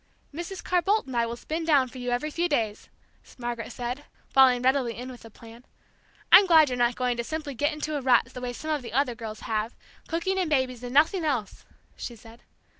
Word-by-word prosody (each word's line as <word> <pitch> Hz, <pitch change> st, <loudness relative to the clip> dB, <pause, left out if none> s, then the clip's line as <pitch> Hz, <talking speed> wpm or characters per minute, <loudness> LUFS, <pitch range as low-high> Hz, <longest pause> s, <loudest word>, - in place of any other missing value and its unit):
"Mrs. 345 Hz, +4 st, -6 dB
Carr 360 Hz, -1 st, +2 dB
Boldt 410 Hz, +5 st, +1 dB
and 260 Hz, -2 st, -7 dB
I 235 Hz, -1 st, +2 dB
will 235 Hz, -, -4 dB
spin 315 Hz, +7 st, -4 dB
down 290 Hz, -5 st, +3 dB
for 255 Hz, +1 st, -11 dB
you 245 Hz, 0 st, -3 dB
every 245 Hz, +6 st, -1 dB
few 345 Hz, +3 st, 0 dB
days," 220 Hz, -8 st, -1 dB, 0.5 s
Margaret 240 Hz, -2 st, -5 dB
said, 250 Hz, +4 st, -5 dB, 0.3 s
falling 255 Hz, -2 st, +5 dB
readily 255 Hz, -3 st, +1 dB
in 250 Hz, +2 st, -6 dB
with 245 Hz, -, -12 dB
the 225 Hz, -, -12 dB
plan. 230 Hz, +2 st, -14 dB, 0.7 s
"I'm 385 Hz, +1 st, +9 dB
glad 320 Hz, -4 st, +6 dB
you're 250 Hz, -, -2 dB
not 240 Hz, 0 st, +2 dB
going 250 Hz, -1 st, -1 dB
to 235 Hz, -, -2 dB
simply 305 Hz, +1 st, -5 dB
get 290 Hz, +5 st, 0 dB
into 305 Hz, 0 st, -4 dB
a 285 Hz, -, -2 dB
rut 250 Hz, -2 st, +4 dB
the 250 Hz, -, -7 dB
way 250 Hz, -1 st, -3 dB
some 310 Hz, +6 st, -5 dB
of 300 Hz, -2 st, 0 dB
the 235 Hz, -3 st, -9 dB
other 265 Hz, -1 st, +1 dB
girls 225 Hz, -2 st, -8 dB
have, 220 Hz, +1 st, -2 dB, 0.3 s
cooking 375 Hz, +3 st, -1 dB
and 360 Hz, -4 st, 0 dB
babies 260 Hz, -4 st, 0 dB
and 245 Hz, -1 st, -6 dB
nothing 320 Hz, +5 st, +4 dB
else!" 255 Hz, -10 st, -2 dB, 0.3 s
she 240 Hz, -, -7 dB
said. 225 Hz, +1 st, -15 dB
255 Hz, 225 wpm, -26 LUFS, 240-310 Hz, 0.7 s, I'm